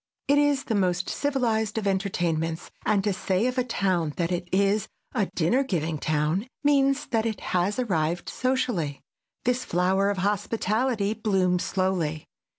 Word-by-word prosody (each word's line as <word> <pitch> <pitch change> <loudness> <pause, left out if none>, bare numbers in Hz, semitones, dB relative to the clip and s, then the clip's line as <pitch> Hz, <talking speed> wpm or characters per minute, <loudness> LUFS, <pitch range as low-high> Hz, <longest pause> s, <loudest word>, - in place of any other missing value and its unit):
It 285 +1 +5
is 290 -1 +2
the 225 - -2
most 185 -3 +1
civilized 230 -7 0
of 220 - -1
entertainments, 175 -4 -1 0.2
and 200 -2 +3
to 205 -1 +1
say 185 +3 0
of 255 0 0
a - - +2
town 185 -9 0
that 170 0 0
it 175 0 -2
is 200 +2 +2 0.3
a 210 -6 +1
dinner 180 +11 +2
giving 165 - -2
town 155 - 0 0.2
means 280 -1 +3
that 225 -1 +2
it 220 -3 -3
has 185 +3 +1
arrived 175 -8 0
socially. 245 - -1 0.4
This 250 +1 +1
flower 190 +3 +2
of 205 - -1
hospitality 210 +2 0
blooms 190 -5 +1
slowly. 180 -5 -1
195 Hz, 155 wpm, -26 LUFS, 175-235 Hz, 0.4 s, It